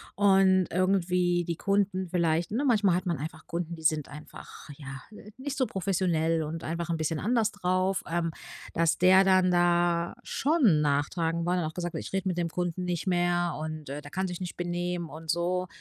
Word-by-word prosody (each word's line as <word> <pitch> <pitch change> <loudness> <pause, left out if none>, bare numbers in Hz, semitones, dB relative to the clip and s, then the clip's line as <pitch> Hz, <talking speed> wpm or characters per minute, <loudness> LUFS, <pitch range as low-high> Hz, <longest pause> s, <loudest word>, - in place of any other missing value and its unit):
und 190 -2 +4
irgendwie 180 -1 +1
die 170 - -2
Kunden 195 -1 0
vielleicht 170 0 0
ne, 265 +6 0
manchmal 205 -8 +3
hat 180 - -2
man 170 -4 -1
einfach 155 +2 -7
Kunden, 170 0 -4
die 160 - -12
sind 155 -3 +1
einfach 150 +1 -11
ja, 140 -2 -9 0.2
äh, 210 - -13
nicht 275 +1 -4
so 260 - +2
professionell 190 -2 -1 0.3
und 160 +2 -5
einfach 170 +1 -3
'n 165 - 0
bisschen 155 -1 -1
anders 225 +1 +1
drauf, 185 -1 0
ähm, 165 -1 -1 0.4
dass 165 0 +2
der 185 +1 +6
dann 185 -1 +4
da 175 -1 +2
schon 260 - +2
nachtragend 160 +3 0
war, 175 - +1
und 180 - +1
dann 155 - -2
auch - - -12
gesagt: 175 -2 -4
„Ich - - -5
rede 190 0 -1
mit 180 -1 -1
dem 170 -1 -1
Kunden 180 +1 -3
nicht 175 -1 -2
mehr“ 175 -1 +1
und, 155 -2 -6
äh: 145 +2 -5
„Der 145 - -11
kann 190 +1 -1
sich 180 0 -6
nicht 180 - -6
benehmen“ 175 -1 -2
und 160 +1 -11
so, 180 +2 0
175 Hz, 200 wpm, -28 LUFS, 165-185 Hz, 0.4 s, der